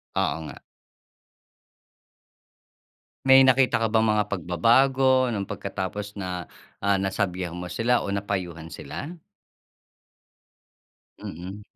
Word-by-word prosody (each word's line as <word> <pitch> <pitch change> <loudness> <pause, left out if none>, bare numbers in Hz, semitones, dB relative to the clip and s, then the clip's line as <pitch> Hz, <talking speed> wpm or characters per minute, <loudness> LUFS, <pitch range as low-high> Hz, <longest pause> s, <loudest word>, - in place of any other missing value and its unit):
Oo - - +1
nga. - - -11 2.7
May 135 0 +8
nakita 130 0 +4
ka 110 - 0
bang 110 0 +3
mga 105 -1 +1
pagbabago 130 - +3
nung 110 -5 -2
pagkatapos 100 +1 -5
na, 90 -3 -5 0.3
ah, 100 0 +2
nasabihan 95 -2 -2
mo 90 +1 -6
sila 120 +6 +1
o - - -5
napayuhan 90 -5 -4
sila? 160 - -7 2.0
Mm. 90 +5 -7
100 Hz, 95 wpm, -25 LUFS, 90-120 Hz, 2.7 s, May